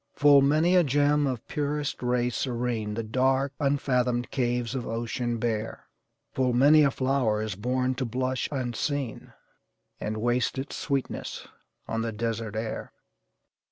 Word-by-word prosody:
"Full 145 -1 +6
many 155 +6 +3
a 180 - +6
gem, 145 0 +2
of 125 -4 -4
purest 150 -1 -2
ray 125 0 +1
serene 120 -4 -2
The 115 - -2
dark, 130 +4 +1
unfathomed 125 -4 +1
caves 120 -2 -1
of 130 -3 -3
ocean 120 +1 -2
bear; 115 -1 -3 0.5
Full 130 -2 +1
many 145 +5 +6
a 145 - +5
flower 130 -5 +1
is 110 -2 -3
born 125 +5 0
to 130 0 -3
blush 130 +2 -2
unseen, 130 -1 -3 0.7
And 110 +1 -3
waste 120 +3 0
its 135 +2 -4
sweetness 135 -2 -3 0.4
on 115 - -2
the 115 0 -2
desert 115 0 -3
air." 110 0 -4
125 Hz, 140 wpm, -27 LUFS, 115-140 Hz, 0.7 s, Full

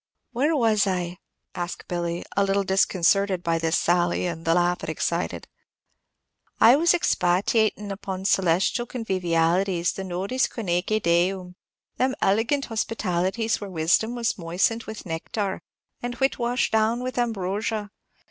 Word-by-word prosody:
"Where 285 +6 +1
was 220 -6 +3
I?" 180 -2 -2 0.3
asked 175 0 -5
Billy, 170 -1 -3
a 200 - +3
little 195 0 +1
disconcerted 190 0 +2
by 165 -1 +1
this 165 0 +1
sally, 175 0 +1
and 165 -1 -4
the 165 0 +3
laugh 175 0 +1
it - - -5
excited. - - -2 1.1
"I 235 +3 +8
was 340 +4 +4
expatiatin' 210 - +1
upon 190 -1 -5
celestial 190 +5 +2
convivialities. 180 -4 0
The 195 - -5
nodes 190 +8 -1
coenoeque 200 0 -1
deum, 180 +2 +1 0.4
them 260 +1 +1
elegant 230 +8 +1
hospitalities 220 -1 -1
where 200 - -6
wisdom 185 +7 +1
was 235 -4 -1
moistened 180 +7 0
with 220 0 -8
nectar, 190 +4 -3 0.4
and 245 0 -4
wit 270 +1 0
washed 245 +2 0
down 220 +2 +1
with 255 0 -3
ambrosia. 210 -1 -2
195 Hz, 135 wpm, -25 LUFS, 175-225 Hz, 1.1 s, I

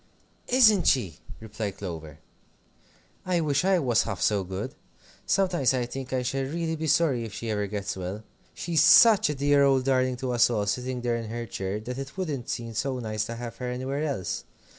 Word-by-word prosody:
"Isn't 220 -8 +5
she!" 100 - +1 0.2
replied 105 -2 -5
Clover. 80 -6 -7 1.1
"I 180 -2 0
wish 145 -2 +1
I 190 0 +3
was 125 -8 +2
half - - -4
so 100 -2 +1
good. 95 +1 -5 0.5
Sometimes 180 -9 +2
I 125 -1 0
think 130 +1 -7
I 130 -1 0
shall 135 +2 -1
really 160 +4 -2
be 160 0 -3
sorry 150 -6 +2
if 110 -3 -7
she 115 0 -4
ever 105 -1 -1
gets 100 0 -4
well. 95 +3 -5 0.3
She's 165 -3 +1
such 220 0 +7
a 150 - -1
dear 145 +1 +3
old 135 -2 +3
darling 130 -1 +1
to 130 0 -3
us 120 0 +4
all, 105 -4 0
sitting 125 +4 -2
there 120 -1 0
in 115 -2 -6
her 120 +1 -4
chair, 95 -1 -4
that 125 +4 -6
it 135 +5 -8
wouldn't 150 -10 -3
seem 115 -1 -4
so 130 +4 -2
nice 110 -3 -3
to 115 - -6
have 115 -1 -7
her 125 0 -4
anywhere 130 +3 -3
else. 120 - -3
125 Hz, 200 wpm, -26 LUFS, 110-145 Hz, 1.1 s, such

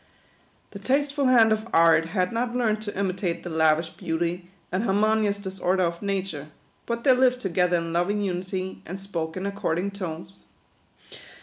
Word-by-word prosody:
Ths 200 -1 -10
tasteful 280 +2 +1
hand 230 -3 +6
of 220 +1 0
Art 165 0 +5
had 180 +1 0
not 240 +1 -1
learned 220 -3 +1
to 205 -3 -6
imitate 185 -3 -2
the 175 - -6
lavish 160 0 +2
beauty 170 +2 -3 0.2
and 185 +4 0
har 195 -3 +1
monious 215 -1 +2
disorder 190 -1 -1
of 170 -1 -2
Nature, 190 -7 -3 0.4
but 235 0 -3
they 270 - +5
lived 250 0 +3
together 180 -4 +1
in 165 0 -3
loving 200 +5 0
unity, 185 0 -3
and 185 +3 -7
spoke 170 -4 -4
in 185 - -4
according 200 -1 -2
tones. 185 -1 -7
190 Hz, 165 wpm, -25 LUFS, 170-215 Hz, 0.4 s, hand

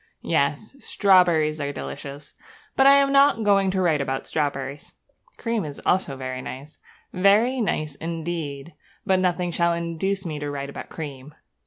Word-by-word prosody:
Yes, 145 - -1
strawberries 170 - +3
are 140 0 -2
delicious; 140 0 -8 0.4
but 270 - +5
I 275 - +8
am 280 0 +4
not 275 -4 +4
going 200 -2 +3
to 190 0 0
write 155 -5 +2
about 135 -1 -3
strawberries. 140 -2 -3 0.4
Cream 230 -3 -2
is 145 -2 -7
also 175 -7 +1
very 130 -1 -5
nice, 140 +4 -9 0.3
very 210 +7 +3
nice 155 -8 -1
indeed; 165 -1 -5 0.3
but 190 -1 +3
nothing 180 -1 0
shall 170 0 +1
induce 170 +4 -2
me 155 -3 -4
to 145 0 -4
write 140 -1 -5
about - - -8
cream. 145 -2 -8
165 Hz, 155 wpm, -24 LUFS, 145-195 Hz, 0.4 s, I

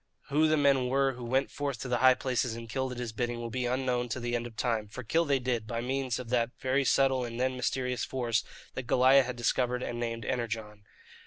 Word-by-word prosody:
Who 150 +3 +4
the 155 0 +3
men 140 -3 +3
were 135 +1 +2
who 125 0 -9
went 130 +3 0
forth 140 -4 -3
to - - -4
the 120 -1 0
high 130 0 +7
places 125 -2 -1
and 115 0 -8
killed 130 +3 -2
at - - -9
his 120 -2 -4
bidding 120 +1 -2
will 115 -1 -5
be 125 0 -1
unknown 125 -1 0
to 120 - -2
the 120 0 -2
end 120 0 -2
of 115 - -13
time 115 -3 -1
for 125 +5 -8
kill 165 +9 +1
they 140 -2 +2
did, 120 -4 -2
by 115 +1 -3
means 130 0 -1
of 125 -2 -7
that 120 -1 +2
very 130 +2 +1
subtle 135 -1 +3
and 120 0 -5
then 130 0 +1
mysterious 125 -1 -1
force 120 -4 0 0.3
that 130 -2 -5
Goliah 130 +2 +6
had 125 0 -4
discovered 125 +1 0
and 120 - -4
named 115 -2 -3
"Energon." 110 -3 -3
125 Hz, 240 wpm, -30 LUFS, 120-130 Hz, 0.3 s, high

